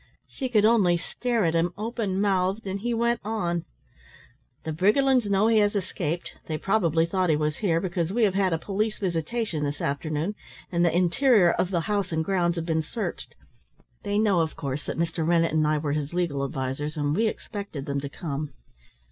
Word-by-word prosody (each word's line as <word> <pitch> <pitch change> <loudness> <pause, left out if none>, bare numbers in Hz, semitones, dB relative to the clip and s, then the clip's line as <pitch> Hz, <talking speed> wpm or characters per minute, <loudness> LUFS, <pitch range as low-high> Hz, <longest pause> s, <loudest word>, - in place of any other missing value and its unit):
She 260 -2 -5
could 215 -4 +4
only 205 -6 +4
stare 235 +4 -1
at 165 - +1
him 170 +1 +1
open 215 -3 -2
mouthed, 195 +1 +1
and 195 +1 -3
he 240 +4 -2
went 235 +1 +1
on. 175 -6 -2 1.0
"The 160 - -3
Briggerlands 225 - +3
know 200 +1 +3
he 225 -1 +4
has 205 0 +2
escaped; 175 -3 -3
they 155 - -2
probably 165 -4 +2
thought 185 +1 0
he 155 - +4
was 150 0 -1
here, 170 -6 +1
because 175 -2 -2
we 235 +3 +1
have 200 -3 +3
had 190 -1 +2
a 165 - +1
police 210 +5 -2
visitation 175 -1 -2
this 145 0 -2
afternoon, 155 +6 -2 0.4
and 170 -1 +2
the 170 - +4
interior 185 +1 +4
of 180 - 0
the 175 -3 0
house 200 0 -1
and 160 0 0
grounds 175 -2 +1
have 165 -1 -3
been 160 -1 +1
searched. 210 +8 -5 0.7
They 205 0 -1
know, 210 -4 +3
of 160 -1 -2
course, 140 +1 -4
that - - -3
Mr. 165 0 -1
Rennett 165 0 +2
and 155 -1 +3
I 155 0 +2
were 150 -1 -2
his 150 +2 -3
legal 160 -6 0
advisers, 135 +3 -3
and 145 0 0
we 225 +3 +2
expected 200 -9 -5
them 140 0 -2
to 140 - -5
come. 150 -2 -5
175 Hz, 200 wpm, -26 LUFS, 160-205 Hz, 1.0 s, could